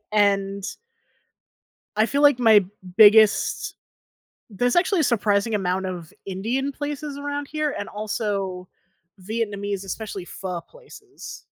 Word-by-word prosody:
and 200 -1 +2 1.3
I 215 +1 +4
feel 285 +3 0
like 290 -4 +6
my 220 -4 +6 0.3
biggest 215 0 +5 0.8
there's 245 +5 +1
actually 370 +1 +3
a - - +3
surprising 215 -3 +1
amount 190 -1 -1
of 175 -3 -6
Indian 235 +9 -2
places 290 0 -5
around 285 0 -4
here 305 -1 -2
and 205 - -4
also 200 -3 -3 0.5
Vietnamese, 205 -2 -3
especially 195 -2 -6
pho 180 -2 -5
places. 425 - -12
215 Hz, 115 wpm, -23 LUFS, 195-280 Hz, 1.3 s, like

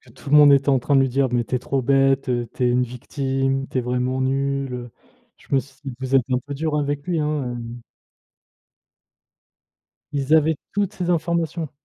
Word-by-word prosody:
tout - - -10
le 150 - +5
monde 145 -1 +8
était 140 +1 +3
en 135 -2 +4
train 140 +3 +1
de 135 - +6
lui 135 - +1
dire: 135 +2 +1
«Mais 120 -1 +1
tu 125 - -3
es - - 0
trop 135 +2 -2
bête, 135 +1 +2
heu, 120 -1 -1
tu - - -3
es 125 - +3
une 125 +1 +2
victime, 135 +2 -2
tu - - -4
es - - -1
vraiment 125 +1 -1
nul, 135 0 -1
heu». 120 -1 -7 0.5
Je - - -22
me 135 - +5
suis 135 +1 -12
dit: 135 -2 -5
«Vous 130 0 -1
êtes 130 - +5
un 125 - +2
peu 140 +3 -8
dur 150 +1 -1
avec 145 -1 -2
lui, 175 -3 -1
hein, 150 -5 -2
heu» 120 +1 -8 2.3
Ils 140 +1 0
avaient 160 0 +3
toutes 200 0 -1
ces 180 -3 -3
informations. 170 -1 -1
135 Hz, 215 wpm, -22 LUFS, 125-145 Hz, 2.3 s, monde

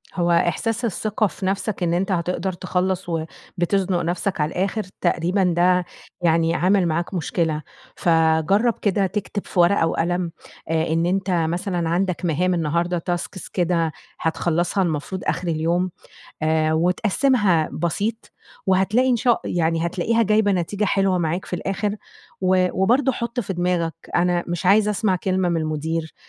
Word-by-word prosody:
هو 175 -1 +1
إحساس 215 +8 +1
الثقة 215 0 0
في 190 +2 -7
نَفسك 195 0 -1
إن 170 -1 +1
أنت 185 +3 0
هتقدَر 180 +1 -1
تخلّص 185 +1 -2
وبتزنُق 175 +3 -2
نَفسك 175 +1 -1
على 150 +2 0
الآخِر 200 +5 -1 0.2
تقريبًا 180 +2 +1
ده 180 0 +3 0.4
يعني 165 -1 +2
عامل 185 +1 +3
معاك 170 +3 -1
مشكلة. 165 -3 -1 0.3
فجرّب 165 +7 +3
كده 200 -1 +2
تكتب 205 +1 -4
في 180 - -2
ورقة 175 -1 +4
وقلم، 175 +1 -1 0.4
آآ 160 0 +1
إن 165 +1 +1
أنت 190 +1 0
مثلًا 175 +1 -1
عَندك 180 +1 0
مهام 175 +3 +1
النهارده 170 +1 0
tasks 175 +2 -4
كده، 170 -3 +1 0.3
هتخلّصها 170 +3 0
المفروض 170 +2 -3
آخِر 180 - -1
اليوم 170 +3 0 0.5
آآ، 155 0 +2
وتقسّمها 185 - +2
بسيط، 205 +7 -2 0.4
وهتلاقي 195 +7 +3
إن 250 - +4
شا 240 0 +3
يعني 165 -1 0
هتلاقيها 225 +7 +1
جايبة 210 0 +3
نتيجة 195 +3 -1
حلوة 195 -1 +2
معاك 175 +2 -1
في - - -8
الآخِر. 200 +3 -2 0.5
و 185 0 +3
وبرضه 250 +7 +3
حُط 235 0 -3
في 200 -4 -3
دماغك، 175 -2 0 0.2
أنا 175 0 +2
مش 175 +1 -3
عايز 205 +3 +5
أسمَع 210 -2 +1
كلمة 185 0 0
من 170 - 0
المدير، 160 +1 -3
180 Hz, 145 wpm, -22 LUFS, 165-195 Hz, 0.5 s, عايز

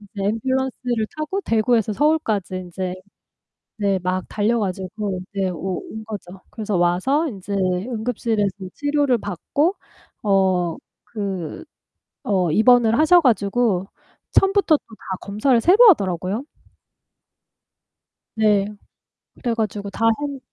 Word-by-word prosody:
인제 205 -1 -8 0.2
앰뷸런스를 255 -2 -1
타고 310 +6 -2
대구에서 225 - +1
서울까지 220 - 0
인제 180 0 -4 0.8
네 200 -2 +1
막 185 0 -1
달려 220 +3 +1
가지고 190 0 -3
네 195 -2 0
오 180 +1 -4
온 220 0 -7
거죠. 195 -4 -8
그래서 215 -3 -3
와서 185 - +2
인제 200 -5 -7
응급실에서 210 +3 -1 0.2
치료를 290 -3 +1
받고 255 - -1 0.5
어 190 -5 +2 0.3
그 195 - -5 0.6
어 185 -5 +1
입원을 230 - +5
하셔 345 +3 +6
가지고 210 - +1 0.4
처음부터 390 -4 +4
또 - - -5
다 190 -1 -6
검사를 225 +5 +1
새로 410 - +7
하더라고요. 195 - +1 1.9
네. 210 -2 +3 0.7
그래 240 - -2
가지고 210 -2 -3
다 225 +3 +1
했 285 -2 -4
210 Hz, 245 characters per minute, -21 LUFS, 190-250 Hz, 1.9 s, 새로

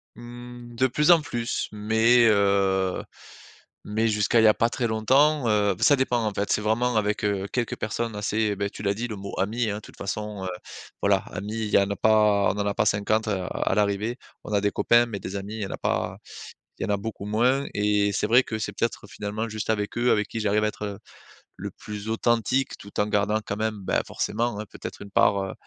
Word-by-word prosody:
Mmh, 120 0 -10
de 130 +3 +3
plus 150 +6 +3
en 170 -2 +6
plus. 120 -5 -3
Mais, 110 +3 +3
heu, 100 -3 +2 0.8
mais 110 +2 0
jusqu'à 105 +1 +2
il - - +3
y - - +7
a 105 - +7
pas 115 - +1
très 120 0 -1
longtemps, 130 +6 +3
heu 105 -2 +2
ça 145 - +5
dépend 125 -3 0
en 105 - -1
fait, 100 +1 -2
c'est - - +2
vraiment 115 +3 +1
avec, 105 0 0
heu, 100 -1 0
quelques 120 -2 -1
personnes 115 +1 -3
assez, 105 0 0
beh, 100 +1 -2
tu 100 - -10
l'as 100 0 +1
dit 120 +3 -3
le 110 - -5
mot 100 -1 -7
ami, 110 +4 0
hein. 100 - -2
De 105 - -6
toute - - -15
façon, 105 0 -4
heu, - - -2 0.5
voilà, 100 -1 +4
amis 100 +4 -5
il - - -6
y - - +4
en 100 0 +2
a 100 - -1
pas 105 -1 +4
on - - -8
en 100 - 0
a 100 - 0
pas - - +1
50 110 +2 +1
à 95 -4 -1
à - - -1
l'arrivée. 105 +3 0 0.3
On 105 - -6
a 100 - +3
des 100 0 +1
copains 120 +3 +4
mais 110 -4 -6
des 95 - -6
amis 100 +2 -5
il - - -5
y - - -1
en - - -8
a - - -4
pas - - -1 0.6
il - - -2
y - - 0
en 105 - 0
a - - +1
beaucoup 100 0 -6
moins. 125 +6 +2
Et 105 0 +2
c'est - - 0
vrai 125 +3 +5
que 110 -2 -4
c'est 110 - -3
peut-être 115 -3 -3
finalement 105 +2 -4
juste 110 0 -2
avec 105 0 -2
eux, 120 +1 +3
avec 105 -1 +2
qui 115 - -5
j'arrive 105 0 +1
à - - +3
être, 105 -1 -5 0.6
le - - -5
plus 105 0 -8
authentique 120 +3 +1
tout 100 - -9
en 105 - 0
gardant 105 +1 +1
quand 100 - -3
même, 110 -1 -2
beh, - - +1
forcément 115 -1 -2
hein, 105 - -5
peut-être - - -8
une 100 - -10
part, 100 0 +3
heu, 95 - -5
105 Hz, 240 wpm, -25 LUFS, 100-115 Hz, 0.8 s, y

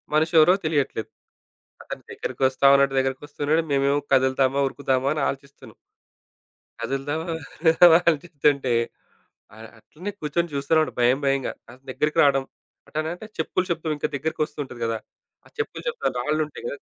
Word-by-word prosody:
మనిషి 160 +2 +2
ఎవరో 155 +4 +7
తెలియట్లేదు. 140 -8 -1 0.7
అతని - - -7
దగ్గరికోస్తా 130 +1 -1
ఉన్నాడు, 140 0 +3
దగ్గరికి 130 0 -1
ఒస్తున్నాడు. 145 +2 0
మేమేమో 140 +1 +2
కదులుతామా, 130 +1 +3
ఉరుకుదామా 135 -1 0
అని 150 - -1
ఆలోచిస్తున్నాం. 135 -4 -9 1.1
కదులుదామా 135 +6 -3 0.4
ఉందమాని 170 +1 +7
అలోచితుంటే 145 -4 0 0.8
అ - - -16 0.2
అట్లనే 175 - -8
కూర్చొని 165 +3 -1
జూస్తూన్నాడు 150 +3 +1
భయం 125 +3 +4
భయంగా 135 -1 0 0.2
అంతా 125 +2 -16
దగ్గరికి 150 +4 -1
రావడం. 135 -2 +3 0.4
అటనంటే 160 +6 -4
చెప్పులు 160 +3 0
శబ్ధం 160 -2 -1
ఇంకా 145 - -2
దగ్గరకోస్తు 155 +1 -3
ఉంటది 120 -3 -11
గదా! 115 -1 -1 0.5
ఆ - - -16
చెప్పులు 440 - -4
శబ్ధం 475 -1 -1
రాళ్ళు 150 +5 0
ఉంటాయి 150 - -11
కదా! 140 - -5
140 Hz, 135 wpm, -24 LUFS, 135-155 Hz, 1.1 s, ఎవరో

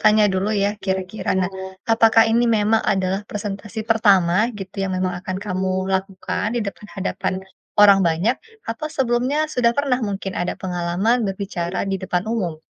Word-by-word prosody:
tanya 215 0 +5
dulu, 190 +2 0
ya, 200 -1 +2
kira-kira, 190 +1 -2
nah 185 - +1 0.4
apakah 225 0 +6
ini 235 +2 +3
memang 215 +2 +2
adalah 190 0 0
presentasi 210 +1 -5
pertama 195 -6 +4 0.2
gitu 195 -1 -8
yang 190 - -2
memang 185 -1 -1
akan 185 0 -3
kamu 190 -1 -1 0.3
lakukan 190 +1 -2
di - - +1
depan 200 +1 -7
hadapan 195 0 -2 0.5
orang 200 -1 +8
banyak, 180 +10 +1 0.3
atau 230 +7 -3
sebelumnya 255 +2 +1 0.2
sudah 240 -2 +3
pernah 275 -3 +2
mungkin 195 -1 -4
ada 175 - -1
pengalaman 185 +6 0
berbicara 190 -2 -3
di - - 0
depan 180 -1 -1
umum? 185 -9 -2
195 Hz, 155 wpm, -21 LUFS, 185-225 Hz, 0.5 s, orang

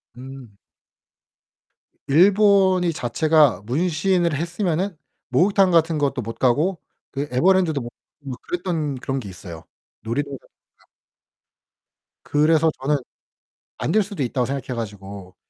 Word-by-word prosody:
음. 130 -4 -11 1.5
일본이 190 +2 +4
자체가 150 -3 +2
문신을 170 - +1
했으면은 175 +2 -2 0.3
목욕탕 185 +7 +3
같은 165 -1 +3
것도 140 -3 0
못 115 +1 -7
가고 150 +8 +1 0.3
그 145 +1 -3
에버랜드도 165 +1 +2
못 120 - -7 0.4
뭐 130 -2 -5
그랬던 165 -6 -3
그런 135 0 -2
게 105 - -8
있어요. 85 -3 -10 0.4
놀이동산 140 +4 -3 0.4
같 - - -29 1.4
그래서 155 +2 +3
저는 145 +2 +1 0.8
안 155 - -2
될 215 +2 +3
수도 200 -6 -7
있다고 125 0 0
생각해 135 -1 -4
가지고 100 -3 -8
150 Hz, 250 characters per minute, -22 LUFS, 125-175 Hz, 1.5 s, 일본이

